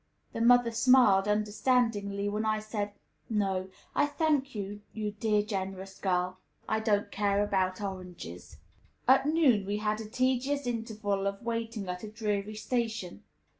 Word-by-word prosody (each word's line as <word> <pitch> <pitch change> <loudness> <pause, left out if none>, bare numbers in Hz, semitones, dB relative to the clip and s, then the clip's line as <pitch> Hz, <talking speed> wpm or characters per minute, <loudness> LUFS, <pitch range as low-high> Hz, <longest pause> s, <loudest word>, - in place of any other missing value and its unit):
The 230 - -3
mother 245 0 +5
smiled, 230 -5 +5
understandingly, 210 -1 +1
when 210 +1 -1
I 215 0 +1
said, 210 -1 -4 0.4
"No, 195 -4 0 0.2
I - - +3
thank 290 -4 0
you, 205 0 -5
you 210 -1 -3
dear, 210 0 +1
generous 195 -2 -5
little 185 -2 +3
girl; 185 - -24 0.3
I 220 - +1
don't 205 -2 +1
care 200 0 +1
about 190 -2 0
oranges." 180 - -7 0.5
At 265 +2 +5
noon 295 -10 +4
we 205 +1 0
had 215 +1 -1
a 215 - -8
tedious 260 +3 0
interval 215 -4 -2
of 200 +3 -4
waiting 230 -3 -3
at 180 0 -4
a 215 - -5
dreary 210 -1 -2
station. 220 - -2
210 Hz, 150 wpm, -30 LUFS, 200-230 Hz, 0.5 s, mother